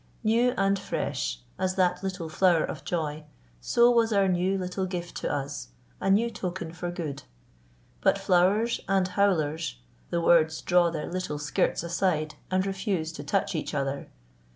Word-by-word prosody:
New 235 +3 +3
and 195 0 +2
fresh - - -3 0.2
as 185 0 0
that 180 -1 +2
little 185 -3 -4
flower 170 0 +3
of - - -5
joy, 155 -3 -2 0.4
so 240 - +4
was 230 -1 +3
our 200 -2 +3
new 185 +1 +1
little 185 0 -2
gift 175 -2 -5
to - - -2
us, 140 - -3 0.3
a - - -1
new 210 +4 +4
token 180 -5 -5
for 175 0 -4
good. 160 -6 -5 0.8
But - - +4
flowers 200 +6 +2
and 190 -1 +2
howlers 165 - +1 0.3
the 170 - 0
words 160 -2 +4
draw 175 -1 +4
their 160 -2 -4
little 180 -4 -3
skirts 150 +2 0
aside 170 -3 0 0.2
and 185 0 +1
refuse 190 -4 -2
to 145 -3 -8
touch 195 +6 0
each 155 -2 -3
other. 140 0 -2
180 Hz, 160 wpm, -27 LUFS, 160-195 Hz, 0.8 s, so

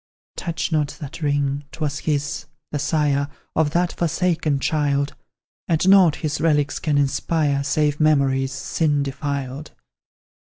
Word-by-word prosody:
Touch 170 -1 -3
not 150 -2 0
that 145 +1 -8
ring; 145 -1 0
'twas 150 -2 -3
his, 145 0 -2 0.2
the 145 - -2
sire 145 -2 +1 0.3
Of 155 -2 +3
that 175 +3 0
forsaken 165 -3 0
child; 140 -1 0 0.5
And 165 +1 +1
nought 190 -5 +6
his 150 0 -2
relics 150 -3 +2
can 150 -3 0
inspire 145 0 +1
Save 145 +1 +1
memories, 135 -3 +2
sin 145 +2 0
defiled. 140 0 -4
145 Hz, 125 wpm, -22 LUFS, 140-155 Hz, 0.5 s, nought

